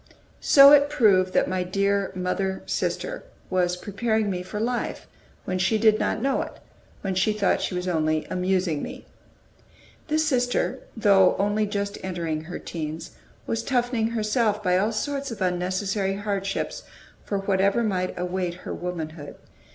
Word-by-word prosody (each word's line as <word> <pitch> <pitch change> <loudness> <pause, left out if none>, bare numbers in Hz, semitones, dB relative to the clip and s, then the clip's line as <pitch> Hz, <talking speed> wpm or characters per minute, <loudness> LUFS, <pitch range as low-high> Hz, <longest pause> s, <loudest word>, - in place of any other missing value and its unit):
So 280 0 +8
it 290 0 +6
proved 200 -10 +3
that - - +3
my 185 0 -1
dear 200 +2 0
mother 190 +1 -2
sister - - -2 0.3
was 180 -1 +1
preparing 215 +2 -1
me 180 -1 -3
for 190 +3 -6
life 240 +2 -2 0.4
when 185 0 -2
she 190 +4 +2
did 215 0 +4
not 220 - -1
know 275 0 +1
it, - - -6 0.5
when 195 -1 -2
she 190 +4 +2
thought 210 -2 +1
she 185 - -2
was 180 +1 -3
only 155 -2 0
amusing 180 -4 0
me. - - -7 1.0
This 310 0 +1
sister, 245 -4 0 0.2
though 195 -4 +5
only 205 +1 +1
just 200 0 -3
entering 165 -4 -3
her 180 - -6
teens, 160 -1 -6 0.3
was 225 - -1
toughening 245 -3 0
herself 215 -1 0
by 180 -2 +2
all 205 +4 +2
sorts 275 +5 -2
of 230 - -7
unnecessary 190 +2 -1
hardships 200 -1 -3 0.4
for 200 - -2
whatever 195 +3 +1
might 185 -4 -1
await 180 0 -2
her - - -4
womanhood. 160 -4 -6
195 Hz, 150 wpm, -25 LUFS, 180-220 Hz, 1.0 s, So